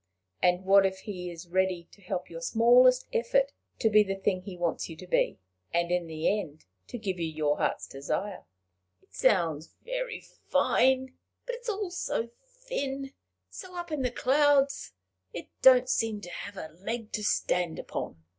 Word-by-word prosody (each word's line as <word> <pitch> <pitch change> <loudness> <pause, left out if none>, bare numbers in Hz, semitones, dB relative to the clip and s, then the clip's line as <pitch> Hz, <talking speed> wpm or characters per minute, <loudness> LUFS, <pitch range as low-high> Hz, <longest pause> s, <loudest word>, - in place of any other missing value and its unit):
And 180 +1 +2
what 195 +1 +7
if 190 0 -1
he 180 -4 -6
is 170 0 -9
ready 185 -1 0
to 200 - -19
help 185 -1 -4
your 165 0 -8
smallest 245 +6 +5
effort 270 +4 +2 0.3
to - - +2
be 215 -1 +6
the 195 -2 -1
thing 195 -1 0
he 185 -1 -8
wants 175 0 -1
you 165 - -7
to 185 - -10
be 180 - +1 0.3
and 170 0 0
in 180 -1 0
the 160 +6 0
end 155 -6 -9 0.2
to - - -6
give 195 -5 -3
you 165 - -1
your 155 -2 0
heart's - - 0
desire?" 185 +9 -4 0.6
"It 95 - -31
sounds 165 - +1
very - - -3 0.3
fine, 260 0 +3 0.3
but - - -3
it's 485 0 -6
all 405 -3 -2
so 235 -9 -2 0.2
thin, 280 - -5 0.4
so 365 - -9
up 345 -1 -5
in 300 -3 -1
the 250 - +1
clouds! 280 - +2 0.4
It - - -7
don't 255 -1 +7
seem 225 -4 0
to 175 - -9
have 205 +2 -7
a 155 -3 -7
leg 225 +1 -4
to 210 - -3
stand 180 -4 0
upon. 80 - -6
205 Hz, 175 wpm, -29 LUFS, 175-265 Hz, 0.6 s, what